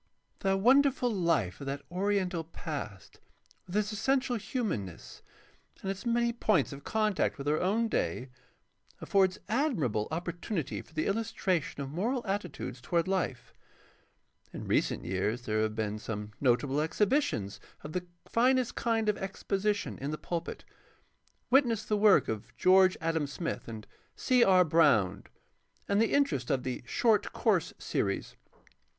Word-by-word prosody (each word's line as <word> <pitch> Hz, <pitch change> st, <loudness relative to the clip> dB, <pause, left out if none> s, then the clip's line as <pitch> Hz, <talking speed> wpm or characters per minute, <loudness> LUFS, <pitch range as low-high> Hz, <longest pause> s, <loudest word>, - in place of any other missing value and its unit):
The 195 Hz, 0 st, +1 dB
wonderful 255 Hz, +3 st, +4 dB
life 160 Hz, -, 0 dB
of 140 Hz, -, -6 dB
that 140 Hz, +1 st, -4 dB
oriental 185 Hz, -2 st, 0 dB
past, 145 Hz, -, -7 dB, 0.5 s
with 180 Hz, -, -7 dB
its 210 Hz, 0 st, 0 dB
essential 255 Hz, +3 st, +1 dB
hiunanness 195 Hz, -, -4 dB, 0.6 s
and 195 Hz, -, -1 dB
its 195 Hz, +4 st, -6 dB
many 235 Hz, 0 st, +2 dB
points 210 Hz, -, +1 dB
of 140 Hz, -, -10 dB
contact 215 Hz, -3 st, 0 dB
with 140 Hz, 0 st, -6 dB
our 150 Hz, +1 st, +2 dB
own 215 Hz, +5 st, +1 dB
day, 130 Hz, -, -2 dB, 0.7 s
affords 190 Hz, -2 st, +2 dB
admirable 195 Hz, -, 0 dB
opportunity 170 Hz, -, -3 dB
for -, -, -20 dB
the 155 Hz, -1 st, -2 dB
illustration 195 Hz, -8 st, -1 dB
of 135 Hz, -, -7 dB
moral 235 Hz, -, -1 dB
attitudes 195 Hz, -, -4 dB
toward 170 Hz, +5 st, 0 dB
Ufe. 185 Hz, -10 st, -2 dB, 1.0 s
In -, -, -7 dB
recent -, -, 0 dB
years 105 Hz, +6 st, -1 dB
there 110 Hz, -1 st, 0 dB
have 110 Hz, 0 st, -1 dB
been 110 Hz, -1 st, -2 dB
some 105 Hz, -1 st, -5 dB
notable 135 Hz, +2 st, +2 dB
exhibitions 160 Hz, -, 0 dB, 0.2 s
of 150 Hz, -, -7 dB
the 180 Hz, -1 st, -3 dB, 0.2 s
finest 255 Hz, +1 st, +2 dB
kind 225 Hz, -2 st, 0 dB
of 210 Hz, -, +1 dB
exposition 195 Hz, +1 st, -2 dB
in 140 Hz, -, -3 dB
the 155 Hz, -, -3 dB
pulpit. 170 Hz, +1 st, -5 dB, 0.9 s
Witness 240 Hz, -5 st, +3 dB
the 210 Hz, -, 0 dB
work 210 Hz, -1 st, +5 dB
of 110 Hz, -2 st, -5 dB
George 185 Hz, 0 st, +5 dB
Adam 160 Hz, -2 st, 0 dB
Smith 165 Hz, +4 st, -4 dB
and 110 Hz, -2 st, -7 dB, 0.3 s
C. 250 Hz, -2 st, +3 dB
R. 185 Hz, -3 st, +5 dB
Brown 110 Hz, -, +3 dB, 0.6 s
and 200 Hz, +1 st, +2 dB
the 225 Hz, -, +2 dB
interest 280 Hz, -, +1 dB
of 135 Hz, -3 st, +1 dB
the 130 Hz, -1 st, -3 dB
"Short 220 Hz, -, +2 dB
Course -, -, +1 dB
Series." -, -, -2 dB
185 Hz, 145 wpm, -30 LUFS, 135-215 Hz, 1.0 s, work